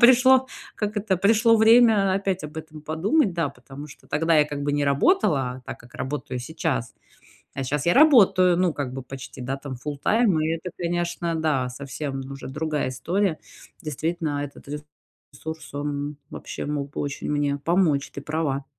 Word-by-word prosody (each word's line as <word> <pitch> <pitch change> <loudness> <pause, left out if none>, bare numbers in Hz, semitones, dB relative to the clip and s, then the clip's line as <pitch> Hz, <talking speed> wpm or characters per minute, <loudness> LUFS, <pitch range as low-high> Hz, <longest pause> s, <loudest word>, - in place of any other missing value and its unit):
пришло, 255 +1 +6 0.3
как 210 0 -3
это, 200 -2 +1
пришло 225 +4 +4
время 220 -3 +6
опять 195 -3 -1
об 150 +1 -8
этом 155 -1 -8
подумать. 185 - +1
Да, 165 -5 0
потому 135 +2 -11
что 145 - -16
тогда 165 +2 +2
я 150 - +6
как 145 -1 -5
бы 145 - 0
не 145 0 +1
работала 140 - +2
так, - - -6
как 120 +2 -18
работаю 130 -1 -4
сейчас. 145 -3 -2 0.6
А 135 - -3
щас 145 +4 -2
я 175 - +4
работаю, 195 - +6
ну, 180 -2 +2
как 140 -4 -4
бы 135 0 -5
почти, 130 0 -9
да, 135 +2 -2
там, 135 -1 -7
фултайм. 155 - +1
И 155 - 0
это, 180 +2 -7
конечно, 170 -1 -2
да, 150 -6 0
совсем 135 +2 -5
уже 135 - -8
другая 150 0 -2
история. 170 +7 -1 0.4
Действительно, 155 -1 -2
этот 140 - -11 0.7
ресурс, 160 0 -8
он 145 0 -3
вообще - - -6
мог 145 -1 -3
бы - - -4
очень 145 0 -4
мне 145 -1 0
помочь. 165 -3 +1
Ты 140 - -6
права. 150 -3 -2
155 Hz, 170 wpm, -24 LUFS, 140-185 Hz, 0.7 s, пришло